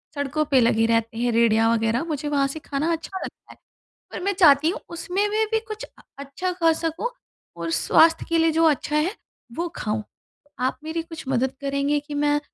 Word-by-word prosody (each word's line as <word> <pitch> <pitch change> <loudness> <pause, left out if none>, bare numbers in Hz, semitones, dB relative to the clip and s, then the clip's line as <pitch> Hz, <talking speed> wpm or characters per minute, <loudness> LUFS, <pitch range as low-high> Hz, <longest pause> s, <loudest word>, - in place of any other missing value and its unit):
सड़कों 285 +2 -1
पे 275 -3 +3
लगे 225 -1 +3
रहते 230 0 0
हैं 240 0 +1
रेड़ियाँ 225 0 +3
वगैरह, 225 +4 +1
मुझे 300 -2 -3
वहाँ 280 -1 +2
से 295 +3 -6
खाना 295 +3 -2
अच्छा 335 +4 -4
लगता - - -10
है। - - -16 0.5
पर - - -5
मैं 400 - +1
चाहती 315 -5 +5
हूँ 365 - -3
उसमें 365 +4 -1
में 435 +1 +1
भी 445 - +2
कुछ 430 0 -6
अ - - -22 0.2
अच्छा 280 +7 -3
खा 330 -2 +3
सकूँ, 330 +9 -2 0.5
और 170 -1 -4
स्वास्थ्य 325 - +4
के 335 - +2
लिए 325 0 +3
जो 325 +1 +2
अच्छा 300 0 +1
है, 335 +8 +1 0.4
वो 340 +3 -2
खाऊँ। 215 0 -2 0.6
आप 255 +1 0
मेरी 320 +1 -3
कुछ 325 -5 -10
मदद 265 0 0
करेंगे 280 +1 0
कि 295 0 -10
मैं 290 0 +2
295 Hz, 200 wpm, -23 LUFS, 255-330 Hz, 0.6 s, चाहती